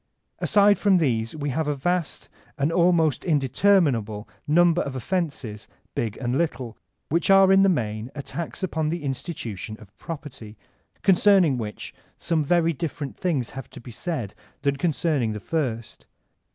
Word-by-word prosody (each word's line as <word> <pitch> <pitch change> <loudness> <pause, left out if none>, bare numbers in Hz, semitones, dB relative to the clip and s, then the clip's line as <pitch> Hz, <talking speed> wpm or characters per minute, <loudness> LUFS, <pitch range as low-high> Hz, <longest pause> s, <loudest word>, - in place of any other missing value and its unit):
Aside 205 0 +4
from 200 -2 +4
these 115 -8 0
we 145 -1 -3
have 155 +3 -1
a 150 - 0
vast, 175 +4 -2 0.3
an 140 +3 +1
almost 165 -5 +3
interminable 135 - +2 0.2
number 175 +3 +4
of 140 -2 -4
offenses 130 - -3 0.3
big 110 -2 -2
and 125 +2 -1
little, 130 -9 -2 0.3
which 170 +5 +1
are 195 0 +7
in 195 0 +6
the 195 - +5
main 110 - -2
attacks 165 +6 -6
upon 160 -4 -1
Uie 170 +2 -2
institution 120 - -5
of 100 -2 -16
property, 130 -9 -8 0.5
concerning 190 -5 +5
which 105 -2 -6 0.2
some 160 -2 0
very 165 +2 +2
different 145 -2 -5
things 150 -10 -1
have 135 -3 -8
to - - -11
be 120 +1 -11
said 120 - -4 0.3
than 140 -1 +1
concerning 145 -6 0
the 105 - -5
first. 120 -3 -3
150 Hz, 150 wpm, -24 LUFS, 120-170 Hz, 0.5 s, are